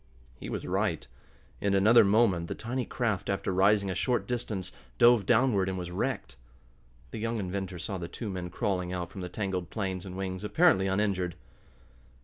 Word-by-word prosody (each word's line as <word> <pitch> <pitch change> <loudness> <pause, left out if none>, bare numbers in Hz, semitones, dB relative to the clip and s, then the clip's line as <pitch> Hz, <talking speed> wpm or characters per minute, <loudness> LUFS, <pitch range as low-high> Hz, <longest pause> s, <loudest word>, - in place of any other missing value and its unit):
He - - -7
was - - -4
right. - - -1 0.5
In 100 -1 +1
another 110 +5 +7
moment 100 -5 +3
the - - -4
tiny 125 +2 -3
craft, 110 -5 -1
after 100 -1 -1
rising 100 +2 +4
a - - -1
short 125 +5 0
distance, 115 -6 -2 0.3
dove 120 -4 +5
downward, 110 -6 +3
and 95 - -3
was 90 -1 -5
wrecked. 70 -5 -3 0.7
The 115 - -5
young 115 +1 -1
inventor 95 -1 -4
saw 95 +2 -4
the 85 - -5
two 115 - -6
men 90 -1 -4
crawling 90 -2 -2
out 90 -1 -4
from 95 - -7
the 90 - -5
tangled 95 -4 -3
planes 95 -4 -3
and 95 -1 -7
wings, 95 0 -4
apparently 105 - +4
uninjured. 95 -3 0
95 Hz, 175 wpm, -29 LUFS, 90-110 Hz, 0.7 s, another